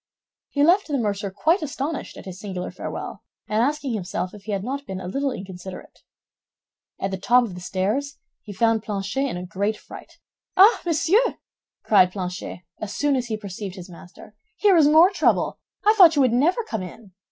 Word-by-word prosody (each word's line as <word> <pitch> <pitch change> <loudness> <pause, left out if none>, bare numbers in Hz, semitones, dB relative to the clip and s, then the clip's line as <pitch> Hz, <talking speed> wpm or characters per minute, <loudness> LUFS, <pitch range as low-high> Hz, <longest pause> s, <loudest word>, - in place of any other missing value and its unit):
He 285 - +1
left 360 +6 +4
the 290 -3 -1
mercer 205 -3 -1
quite 315 - +1
astonished 300 0 -4
at - - -10
his 185 -1 -8
singular 185 -3 -5
farewell, - - -6 0.3
and 215 +1 +1
asking 280 0 0
himself 185 -2 -3
if 205 -1 -13
he 215 - -4
had 195 -1 -2
not 275 +4 -4
been 190 -1 -5
a 185 - -6
little 275 +9 -1
inconsiderate. 185 -3 -9 1.0
At 195 - -2
the 190 - -4
top 245 +6 +4
of 220 -6 -5
the 180 - -9
stairs 210 +11 -2 0.2
he 210 - -10
found 225 +2 +2
Planchet 210 +6 -2
in 175 - -4
a 180 - -6
great 200 +4 -2
fright. - - -13 0.4
"Ah, 405 +5 +7
monsieur!" 345 +9 +2 0.5
cried 185 -4 +5
Planchet, 180 -2 -5 0.2
as 210 -2 -5
soon 290 -1 +1
as 250 -2 -2
he 220 -2 -2
perceived 200 -2 -7
his 180 -1 -10
master, 180 +4 -14 0.2
"here 405 -3 +4
is 315 -4 +6
more 320 +5 +6
trouble. 390 - +1 0.3
I 425 - +6
thought 360 -7 +7
you 285 - +4
would 250 -3 +2
never 340 - +2
come 220 - -4
in." 190 +3 -10
220 Hz, 195 wpm, -23 LUFS, 190-290 Hz, 1.0 s, Ah